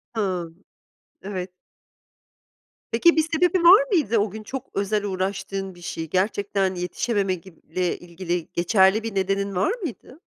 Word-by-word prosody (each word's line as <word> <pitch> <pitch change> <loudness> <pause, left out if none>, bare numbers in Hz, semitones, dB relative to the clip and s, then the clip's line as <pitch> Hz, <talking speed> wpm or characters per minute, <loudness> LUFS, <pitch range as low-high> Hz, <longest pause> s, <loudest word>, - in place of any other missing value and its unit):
Hımm, 180 -4 -3 0.6
evet. 185 -2 -5 1.4
Peki, 325 +10 +5
bir - - +6
sebebi 355 +1 +3
var 390 +8 +9
mıydı, 260 - +2
o 205 0 +2
gün 215 +2 -8
çok 265 +4 -6
özel 205 +1 0
uğraştığın 195 0 -3
bir 175 - -15
şey? 165 -2 -5
Gerçekten 195 0 0
yetişememe 195 +2 -1
gib 170 -1 -15
ile 180 +1 -1
ilgili 175 -1 -4
geçerli 190 +4 +3
bir 225 -3 -5
nedenin 195 0 0
var 185 - +2
mıydı? 275 -2 -7
195 Hz, 140 wpm, -24 LUFS, 185-220 Hz, 1.4 s, var